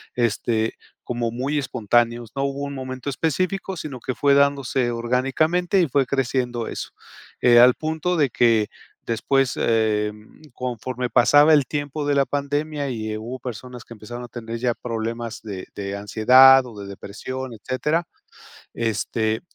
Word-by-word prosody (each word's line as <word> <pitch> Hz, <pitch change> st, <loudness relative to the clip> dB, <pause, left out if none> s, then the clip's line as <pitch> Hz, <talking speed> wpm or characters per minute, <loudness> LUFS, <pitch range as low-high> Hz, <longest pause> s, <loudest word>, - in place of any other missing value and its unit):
Este, 115 Hz, -1 st, 0 dB, 0.3 s
como 120 Hz, -1 st, -2 dB
muy 135 Hz, +6 st, -2 dB
espontáneos. 120 Hz, -2 st, 0 dB
No 135 Hz, -, -1 dB
hubo 140 Hz, 0 st, -3 dB
un 140 Hz, 0 st, -4 dB
momento 130 Hz, 0 st, -5 dB
específico, 185 Hz, +6 st, -2 dB
sino 140 Hz, -5 st, -6 dB
que 125 Hz, +1 st, -4 dB
fue 140 Hz, +4 st, +3 dB
dándose 140 Hz, -3 st, +2 dB
orgánicamente 135 Hz, +10 st, +1 dB
y 175 Hz, -, +3 dB
fue 135 Hz, 0 st, +1 dB
creciendo 125 Hz, -3 st, -1 dB
eso, -, -, -5 dB, 0.5 s
eh, 120 Hz, -1 st, +6 dB
al 125 Hz, +1 st, +7 dB
punto 160 Hz, +3 st, -2 dB
de 140 Hz, -6 st, +2 dB
que 115 Hz, -3 st, +3 dB, 0.4 s
después, 130 Hz, +3 st, +1 dB
em, 105 Hz, -1 st, -1 dB
conforme 125 Hz, 0 st, -4 dB
pasaba 145 Hz, +6 st, +6 dB
el 145 Hz, -4 st, +4 dB
tiempo 145 Hz, +1 st, -3 dB
de 145 Hz, -, +2 dB
la 140 Hz, -, +3 dB
pandemia 145 Hz, +1 st, -2 dB
y, 110 Hz, -3 st, -4 dB
eh, 110 Hz, -, -4 dB
hubo 120 Hz, +4 st, -6 dB
personas 125 Hz, 0 st, -8 dB
que 115 Hz, -, -12 dB
empezaron 120 Hz, +3 st, -8 dB
a 120 Hz, -, -8 dB
tener 115 Hz, 0 st, -6 dB
ya 120 Hz, 0 st, 0 dB
problemas 115 Hz, 0 st, -5 dB
de 100 Hz, -4 st, -7 dB
de 100 Hz, -1 st, -4 dB
ansiedad 130 Hz, +6 st, +6 dB
o 120 Hz, -, -10 dB
de 100 Hz, -, -7 dB
depresión, 125 Hz, +6 st, -7 dB
etcétera. 150 Hz, -, -2 dB, 0.7 s
Este, 110 Hz, 0 st, -1 dB
125 Hz, 155 wpm, -23 LUFS, 115-140 Hz, 0.7 s, al